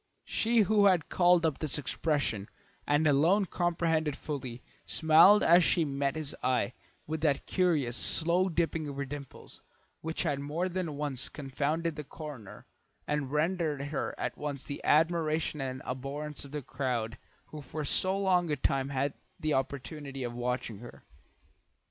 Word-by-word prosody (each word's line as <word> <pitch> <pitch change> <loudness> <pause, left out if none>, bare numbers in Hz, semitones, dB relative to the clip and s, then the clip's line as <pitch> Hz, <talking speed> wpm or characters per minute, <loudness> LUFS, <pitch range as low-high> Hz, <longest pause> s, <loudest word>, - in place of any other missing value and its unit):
She 230 0 +2
who 205 0 +4
had 180 -5 +2
called 175 -2 +4
up 155 -3 0
this 155 -3 0
expression, 145 -8 -1 0.4
and 145 +2 +3
alone 165 +8 +4
comprehended 165 -4 0
it - - -16
fully, 130 -5 -5 0.2
smiled 165 +6 +6
as 175 +2 +6
she 165 0 +3
met 140 0 -1
his 155 -2 -4
eye, 125 -1 +1 0.3
with 155 0 -4
that 150 -3 +1
curious 155 -10 +1
slow 175 +3 +2
dipping 165 -2 -1
of 140 -1 -6
her 140 - -2
dimples 140 0 -9 0.4
which 160 0 -3
had 140 - 0
more 150 +6 -2
than 175 -5 -3
once 145 -3 -1
confounded 150 +3 -2
the 150 - -4
coroner, 140 - -9 0.4
and 150 -3 -2
rendered 150 -2 0
her 150 - -3
at - - -3
once 145 -2 -4
the 140 - -7
admiration 160 -1 +2
and 130 -1 -4
abhorrence 140 +3 -5
of 140 - -11
the 150 -1 -4
crowd 120 -4 -2 0.3
who 150 - -7
for 150 +3 -5
so 190 +7 +1
long 185 -3 +2
a 150 - +1
time 135 0 0
had 140 +1 0
had - - -26 0.3
the 155 -1 0
opportunity 135 +1 -3
of 120 -1 -4
watching 120 -3 -3
her. 120 +1 -12
150 Hz, 160 wpm, -30 LUFS, 135-165 Hz, 0.4 s, smiled